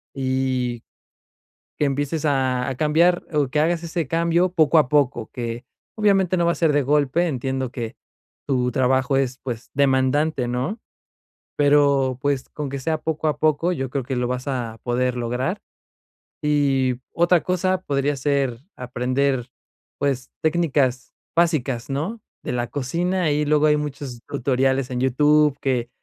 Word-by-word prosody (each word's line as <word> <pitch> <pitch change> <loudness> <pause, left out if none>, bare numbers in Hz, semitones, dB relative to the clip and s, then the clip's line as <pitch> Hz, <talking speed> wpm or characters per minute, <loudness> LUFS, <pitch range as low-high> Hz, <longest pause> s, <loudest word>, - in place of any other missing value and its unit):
y 130 -2 -1 1.0
que - - +1
empieces 145 +3 -1
a 130 -3 +1
a 135 - -2
cambiar 165 +5 +3
o 145 -3 +1
que 150 +3 0
hagas 165 +2 +1
ese 165 -3 -3
cambio 170 +3 +2
poco 160 -2 +4
a 150 - +3
poco 130 -5 +1
que 120 -1 -5 0.3
obviamente 195 -4 +3
no 170 -1 +2
va 170 - +3
a - - -3
ser 165 -3 +2
de 145 0 +2
golpe, 145 +4 +2
entiendo 130 -3 -2
que, 115 -1 -5 0.5
tu 125 -3 +1
trabajo 130 +2 +2
es 130 -1 0
pues 120 -3 -6
demandante, 135 0 +2
¿no? 130 - -2 0.8
pero 140 -3 +3
pues 140 -2 -1
con 150 -1 -5
que 140 +1 -4
sea 155 +4 -1
poco 160 0 -2
a 150 - -2
poco, 155 +3 +2
yo 135 -6 -3
creo 135 +1 -2
que 130 +2 -3
lo 125 0 0
vas 125 0 -3
a 120 -5 -3
poder 125 +1 0
lograr 125 - -2 0.8
y 135 -4 +2 0.2
otra 170 0 +3
cosa 185 +1 0
podría 140 -2 0
ser 135 -3 0 0.2
aprender, 125 +1 -1 0.5
pues 135 -3 -1
técnicas 145 -6 +1 0.2
básicas, 145 -8 +1
¿no?, 165 +12 -3 0.2
de - - -3
la 120 -1 -1
cocina 170 +5 -1
y 150 +1 0
luego 150 0 +3
hay 150 0 +4
muchos 140 -4 -5
tutoriales 135 -1 0
en 125 -1 -2
YouTube 145 +2 +3
que 125 -3 0
140 Hz, 155 wpm, -22 LUFS, 130-155 Hz, 1.0 s, poco